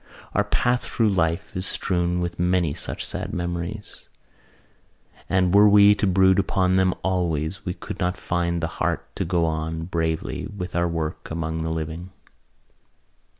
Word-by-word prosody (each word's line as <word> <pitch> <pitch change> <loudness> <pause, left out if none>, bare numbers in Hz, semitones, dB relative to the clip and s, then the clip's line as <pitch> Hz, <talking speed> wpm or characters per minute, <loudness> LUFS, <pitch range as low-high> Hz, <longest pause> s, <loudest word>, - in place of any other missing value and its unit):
Our - - +2
path 125 0 +1
through 110 -3 +1
life 85 -3 0
is 90 0 -1
strewn 90 -1 0
with 85 0 -4
many 90 -3 +2
such - - -5
sad - - -3
memories: 85 +4 -5 1.2
and 95 -1 +2
were 105 +1 +7
we 100 0 +7
to 105 0 0
brood 95 +1 +4
upon 95 -1 +1
them 95 -1 +3
always 90 -1 -1
we 90 - -2
could - - -7
not 90 0 0
find 85 -1 -1
the - - +1
heart - - -2
to - - -1
go 85 -1 +1
on 80 0 -2
bravely 80 -2 -2
with 90 -4 -6
our 85 0 +2
work 80 -2 -4
among 80 0 -3
the 80 - -2
living. 80 +2 -4
90 Hz, 155 wpm, -24 LUFS, 80-95 Hz, 1.2 s, were